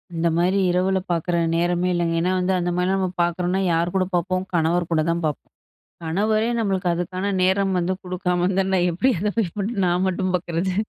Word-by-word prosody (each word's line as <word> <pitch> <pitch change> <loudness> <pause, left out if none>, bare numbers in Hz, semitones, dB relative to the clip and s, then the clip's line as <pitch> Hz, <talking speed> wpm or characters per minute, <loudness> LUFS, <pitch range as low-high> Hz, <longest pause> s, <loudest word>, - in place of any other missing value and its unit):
இந்த 165 +1 +1
மாதிரி 180 +3 +2
இரவுல 190 +2 +1
பாக்கிற 170 +1 0 0.2
நேரமே 175 +1 +1
இல்லங்க. 170 -1 0
ஏன்னா 180 +2 +1
வந்து 185 +1 +1
அந்த 175 - -1
மாரிலாம் 185 +2 +1
நம்ம 185 -1 -1
பாக்குறோம்னா 180 +2 0
யார் 170 +2 0
கூட 185 -1 +2
பார்ப்போம், 185 +1 -1
கணவர் 170 +1 +1
கூட 155 - +2
தான் 170 0 -1
பார்ப்போம். 150 -3 -4 0.5
கணவரே 215 +7 +1
நம்மளுக்கு 195 -5 0
அதுக்கான 185 +3 -2
நேரம் 190 +1 +2
வந்து 180 +2 0
குடுக்காம 180 -1 -1
இருந்தா 190 -1 +2
எப்படி 215 +11 +1
அதை 210 +1 0
போய் 205 +1 -1
நான் 175 +2 +1
மட்டும் 185 0 -1
பார்க்கறது? 175 +1 -2
180 Hz, 175 wpm, -22 LUFS, 175-190 Hz, 0.5 s, மாதிரி